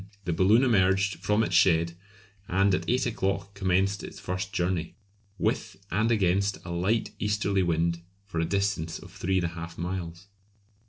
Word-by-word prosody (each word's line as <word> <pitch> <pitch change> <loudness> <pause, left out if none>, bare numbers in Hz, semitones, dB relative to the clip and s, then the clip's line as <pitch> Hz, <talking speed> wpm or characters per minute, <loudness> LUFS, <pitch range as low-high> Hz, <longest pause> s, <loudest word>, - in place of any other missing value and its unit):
the 90 - 0
balloon 100 +9 +4
emerged 100 -4 +3
from 105 +1 +2
its 90 - -2
shed, 85 -2 +4 0.5
and 95 +1 +2
at - - -1
eight 125 +1 +2
o'clock 100 -4 -2
commenced 95 +1 +1
its - - -8
first 90 +3 -4
journey, 90 -2 -1 0.4
with - - -1
and 110 +5 +2
against 100 -1 +2
a 85 - -5
light 100 +5 0
easterly 105 -2 +1
wind 85 -1 0 0.2
for 90 -5 -4
a 80 - +1
distance 100 -3 -1
of - - -13
three 95 +1 -1
and 90 - +1
a - - -1
half 85 0 -8
miles. 85 0 -5
95 Hz, 165 wpm, -27 LUFS, 85-100 Hz, 0.5 s, balloon